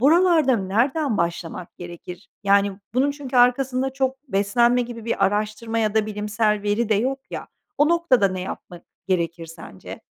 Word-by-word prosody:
buralarda 315 -2 +4
nereden 235 +7 0
başlamak 170 0 -3
gerekir? 175 +1 -10 0.2
Yani, 200 0 +3 0.2
bunun 270 +3 +2
çünkü 280 -3 -5
arkasında 255 +1 +3
çok 265 -1 -1
beslenme 235 +4 +2
gibi 235 -2 -8
bir 225 -4 +1
araştırma 215 +3 -1
ya 215 -2 0
da 220 -1 +2
bilimsel 210 0 -1
veri 210 +2 0
de 220 - +3
yok 260 +6 0
ya. - - -6 0.3
O 295 +1 +4
noktada 325 -12 +3
ne 185 0 -4
yapmak 180 -1 -8 0.3
gerekir 170 -2 -1
sence? 160 - -11
220 Hz, 155 wpm, -23 LUFS, 195-260 Hz, 0.3 s, buralarda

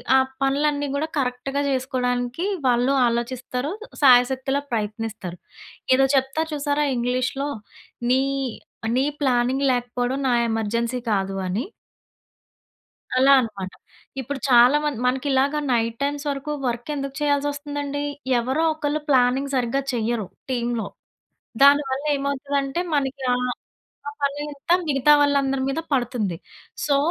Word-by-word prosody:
ఆ - - +7 0.2
పనులన్నీ 285 +1 +1
గూడా 310 +3 -1
కరెక్ట్‌గా 270 +1 -1
చేసుకోవడానికి, 250 +3 -1 0.2
వాళ్ళు 245 +2 +3
ఆలోచిస్తారు. 250 +4 -2 0.3
సాయశక్తులా 265 +1 +4
ప్రయత్నిస్తారు. 210 -4 -4 0.6
ఏదో 270 - +4
చెప్తారు 270 +5 0
చూసారా? 290 0 0
ఇంగ్లీషులో 255 +3 -1 0.6
నీ, 260 +1 +4 0.7
నీ 265 - +2 0.2
ప్లానింగ్ 260 +1 +2
లేకపోవడం. 245 +1 -1
నా - - +3 0.2
ఎమర్జెన్సీ 230 +2 -1
కాదు 195 -1 0
అని. 200 - -2 1.5
అలా 270 +2 +6
అనమాట. 200 -6 -4 0.5
ఇప్పుడు 270 +2 -5
చాలా 245 +3 +7
మంది 295 -6 -2
మనకి 260 +3 0
ఇలాగా 280 +3 +2
నైట్ 230 0 0
టైమ్స్ 285 +1 -2
వరకు 280 +2 -3 0.2
వర్క్ 240 +3 -3
ఎందుకు 275 -1 -4
చేయాల్సొస్తుందండి. 290 0 -1 0.4
ఎవరో 265 +7 0
ఒకళ్ళు 300 0 -2
ప్లానింగ్ 265 +1 +3
సరిగ్గా 255 +2 0
చెయ్యరు 230 -3 -1 0.2
టీములో. 235 -4 -1 0.8
దానివల్లేమవుతదంటే 280 +1 +2
మనకి 275 -1 -1
ఆహ్, 250 0 0 0.6
ఆ - - -2
పని 280 +1 0
అంతా 290 +5 +1
మిగతా 280 +1 +4
వాళ్ళందరి 275 -2 +2
మీద 275 +4 -1
పడుతుంది. 235 -8 0 0.5
సో, 285 -2 +3
265 Hz, 115 wpm, -23 LUFS, 245-285 Hz, 1.5 s, ఆ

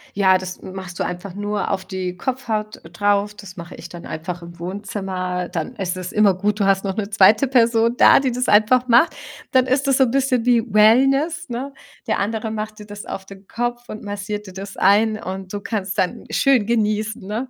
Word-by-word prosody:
Ja, 190 -2 +4
das 185 0 -7
m 185 - -10
machst 185 -2 -8
du - - +1
einfach 180 +1 -5
nur 205 +1 -2
auf 190 -1 -2
die 185 -1 -4
Kopfhaut 220 -1 -3
drauf. 205 +4 0
Das 200 -2 -12
mache 170 0 -9
ich - - -10
dann 175 -1 -10
einfach 170 +2 -6
im 170 0 -12
Wohnzimmer. 185 -1 -4
Dann 175 +7 -4
ist 185 -4 -3
es 185 -1 -6
immer 210 -3 +4
gut, 205 +3 -1
du 200 - +2
hast 195 0 +2
noch 195 -2 -2
'ne 205 -2 -3
zweite 210 +5 +5
Person 235 -2 +3
da, - - +7
die 265 -2 0
das 250 +1 -2
einfach 235 +5 +4
macht. 245 +7 +4 0.4
Dann 260 -1 +4
ist 265 +2 0
das 270 - +3
so 270 - +5
'n 245 - 0
bisschen 260 -3 +1
wie 240 -2 +4
Wellness, 270 - +3
ne? 260 +4 -5 0.3
Der - - 0
andere 220 +2 -2
macht 215 0 -5
dir 210 - -10
das 205 0 -9
auf 190 - -6
den 195 0 -14
Kopf 240 +1 -4
und 215 - -7
massiert 205 +1 -5
dir 185 - -10
das 195 +1 -8
ein 215 +3 +3
und 190 0 -6
du 205 - -4
kannst 200 -3 -3
dann 180 - -1
schön 270 -6 +3
genießen, 215 -2 -1
ne? 225 +6 -4
210 Hz, 215 wpm, -21 LUFS, 190-235 Hz, 0.4 s, da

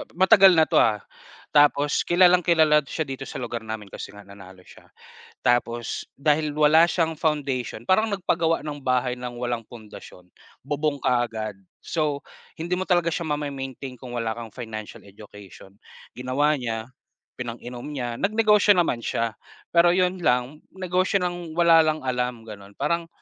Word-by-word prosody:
ma-matagal 190 0 +6
na 160 - +6
'to - - +2
ah, 105 -3 +2 0.5
tapos 145 0 +3
kilalang-kilala 175 -4 +5
siya 160 - -2
dito 135 -2 -7
sa - - -10
lugar 120 -2 -5
namin, 110 -3 -6
kasi - - -9
nga 105 - -12
nanalo 95 -2 -14
siya. - - -18 0.5
Tapos 120 -1 0 0.2
dahil 150 +1 +1
wala 155 +2 +5
siyang 165 -2 +1
foundation, 140 -7 -2
parang 215 +3 +3
nagpagawa 170 -4 0
ng 145 -2 -7
bahay 125 -1 0
ng 125 -1 -7
walang 120 -1 -2
pundasyon, 105 -5 -13 0.4
bubong 145 -1 -1
kaagad. 115 -4 -1 0.2
So, 150 -4 -2 0.4
hindi 175 +2 -1
mo 185 - -2
talaga 175 -3 +1
siya 170 +1 -1
mame-maintain 140 -3 -5
kung 125 0 -11
wala 110 -1 -2
kang 115 -2 -8
financial 110 -3 -8
education. 100 -1 -14 0.3
Ginawa 135 +4 0
niya, 115 0 -4 0.5
pinang-inom 120 +1 -7
niya, 120 -5 -4
nag-negosyo 210 0 +4
naman 170 -9 +1
siya, 115 -1 -2 0.4
pero 175 +1 +5
'yon 185 0 +1
lang, 125 0 0 0.2
negosyo 185 +1 0
nang 175 -2 -4
wala 170 -1 +6
lang 155 -2 +1
alam, 125 -2 -2
gano'n. 100 -2 -12
Parang 170 +3 -1
140 Hz, 145 wpm, -24 LUFS, 120-165 Hz, 0.5 s, ma-matagal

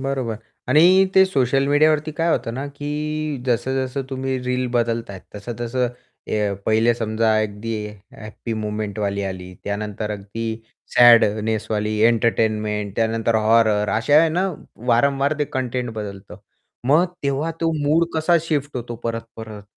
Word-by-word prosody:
बरोबर. 130 -4 -2 0.3
आणि 180 +5 +6
ते 190 - +7
सोशल 135 -5 +1
मीडियावरती 155 +1 +3
काय 165 +3 0
होतं 115 -7 -1
ना, 135 +3 -4
की 150 0 -4
जसं-जसं 130 +2 -1
तुम्ही 130 0 -2
रील 125 0 -1
बदलताय, 115 -4 -2
तसं-तसं 120 +3 -2 0.4
अ, 105 -2 0
पहिले 110 +2 +3
समजा 110 -1 0
अगदी 105 +2 -4 0.2
हॅप्पी 105 +2 -9
मोमेंटवाली 105 -2 -3
आली, 90 -1 -6
त्यानंतर 105 +1 -3
अगदी 105 +2 -5 0.5
सॅडनेसवाली,, 110 -2 +4
त्यानंतर 115 0 +4
एंटरटेनमेंट, 110 +1 -1
हॉरर. 110 -1 +3
अशा 135 +7 +4
आहे 165 - +3
ना, 175 +4 0 0.4
वारंवार 140 +4 +3
ते 150 - +1
कंटेंट 125 -1 -2
बदलतं. 100 -2 -7 0.5
मग 150 +6 +5 0.2
तेव्हा 140 +3 -1
तो 165 -1 +2 0.2
मूड 165 +3 +3
कसा 160 +2 +3
शिफ्ट 145 -3 -2
होतो 120 -1 -5
परत-परत? 115 -2 -6
115 Hz, 125 wpm, -21 LUFS, 110-140 Hz, 0.5 s, ते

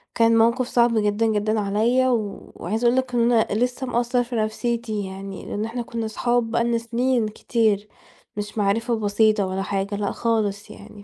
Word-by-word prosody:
كان 230 0 +4
موقف 235 +2 +3
صعب 235 -1 +3
جدًا، 210 +1 +1
جدًا 215 0 +1
عليّا 225 +6 +2
وعايزة 220 -1 -3
أقول 240 +2 +3
لك 260 -1 -1
إن 235 0 +3
أنا 225 -2 +3
لسّه 250 +3 -1
مأثّر 245 +1 +1
في 240 0 -6
نفسيتي 220 -1 -2
يعني 195 0 -8
لإن 210 +2 -3
إحنا 240 +2 -4
كُنّا 235 -1 -4
اصحاب 235 +1 0
بقى 235 0 +2
لنّا 235 0 +1
سِنين 235 0 0
كتير 215 -1 0 0.5
مش 210 +1 -5
معرفة 225 +4 +1
بسيطة 210 -1 +2
ولا 190 +1 -3
حاجة، 195 +1 -2
لأ 200 -1 -2
خالص 215 -3 -1
يعني 205 -1 -12
225 Hz, 175 wpm, -23 LUFS, 210-235 Hz, 0.5 s, كان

